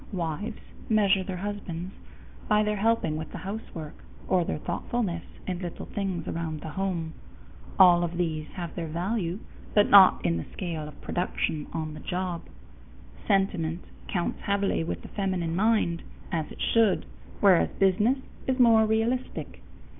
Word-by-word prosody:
Wives 190 +4 -3 0.3
measure 200 -3 +4
their 185 -1 -4
husbands 190 -2 -5 0.5
by 210 0 +4
their 210 0 0
helping 205 -7 +1
with 160 - -6
the - - -6
housework 180 -4 -6 0.3
or 185 -2 +3
their - - -2
thoughtfulness 175 +2 -2 0.2
in 180 -2 -3
little 175 -2 -6
things 190 -5 -3
around 160 -2 -3
the 160 - -6
home; 170 -2 -2 0.6
all 175 -2 +7
of 170 0 -3
these 155 -3 -1
have 175 -3 -5
their 165 -2 -4
value, 175 +2 -1 0.4
but 205 -1 +5
not 195 -2 +8
in 85 - +2
the 80 - -4
scale 165 -5 -4
of 150 - -12
production 160 -4 -2
on 155 -1 -3
the 155 - -8
job. 180 0 -3 0.9
Sentiment 185 -4 +1 0.2
counts 175 -3 -2
heavily 200 -4 +1
with 165 - -4
the - - -8
feminine 185 -5 -1
mind, 200 -4 +2 0.3
as 160 -4 -2
it - - -11
should, 225 -4 +3 0.3
whereas 190 -4 +5
business 210 +7 +3 0.3
is 260 -1 +1
more 225 -3 +6
realistic. 225 +4 -1
185 Hz, 150 wpm, -27 LUFS, 165-205 Hz, 0.9 s, not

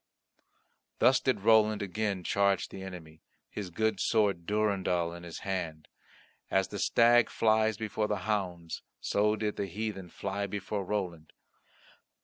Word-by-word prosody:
Thus 130 +1 +5
did 130 -6 0
Roland 110 -1 +4
again 100 -1 -2
charge 100 +1 +1
the 95 - -8
enemy, 85 -4 -9 0.3
his 100 -3 -5
good 110 +5 0
sword 100 -7 +1
Durendal 95 -5 +1
in 85 - -9
his 85 -1 -8
hand; 85 -5 -3 0.6
as 95 0 +1
the 100 - -5
stag 120 +3 +5
flies 110 -1 +2
before 110 0 -2
the - - 0
hounds, 90 -6 -2 0.2
so 105 +1 +1
did 105 -1 -2
the 100 - -2
heathen 95 -1 -5
fly 100 +3 -3
before 100 +1 -3
Roland. 90 -5 -4
100 Hz, 135 wpm, -30 LUFS, 90-110 Hz, 0.6 s, Thus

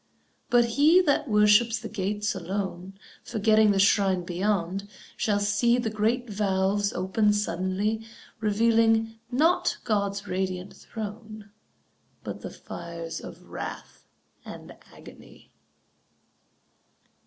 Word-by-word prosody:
But 240 -1 +5
he 290 +9 +5
that 295 -3 +1
worships 210 +2 +4
the - - -7
gates 205 0 -2
alone, 190 0 -5 0.3
Forgetting 215 0 +3
the 200 - +2
shrine 195 -2 +3
beyond, 190 +1 -2 0.3
shall 205 -2 0
see 205 +4 +2
The 235 -3 -2
great 225 +4 0
valves 200 -1 0
open 190 +4 +1
suddenly, 205 +3 -1 0.3
Revealing, 225 +1 +2
not 310 +8 +2
God's 200 -2 -1
radiant 185 0 -3
throne, 215 -1 -8 0.7
But - - -6
the - - -6
fires 170 -1 -7
of - - -11
wrath - - -8 0.4
and - - -10 0.2
agony. - - -15
210 Hz, 105 wpm, -26 LUFS, 190-225 Hz, 0.7 s, But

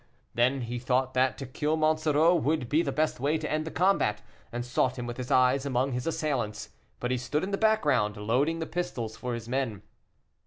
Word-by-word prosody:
Then 130 +3 +2
he 120 +1 -4
thought 130 +1 0
that 130 +1 +2
to 135 - -6
kill 150 +5 -1
Monsoreau 155 +1 +3
would 155 -5 +1
be 150 +6 +3
the 145 -5 -1
best 155 -1 0
way 145 +5 +1
to 155 -1 -4
end 155 0 0
the - - -4
combat, 160 - +1 0.3
and 120 0 -4
sought 125 +1 0
him 120 - -4
with 120 0 -5
his 125 -1 -5
eyes 130 +1 +4
among 135 -1 0
his 125 +2 -3
assailants, 135 -10 -2 0.3
but 125 - -2
he 130 - 0
stood 135 +5 -1
in 195 - -3
the - - +2
background, 145 - +2
loading 125 +10 +1
the 160 - -3
pistols 120 -11 -4
for 125 +1 -4
his 115 -1 -7
men. 125 -5 -2
130 Hz, 210 wpm, -28 LUFS, 120-155 Hz, 0.3 s, eyes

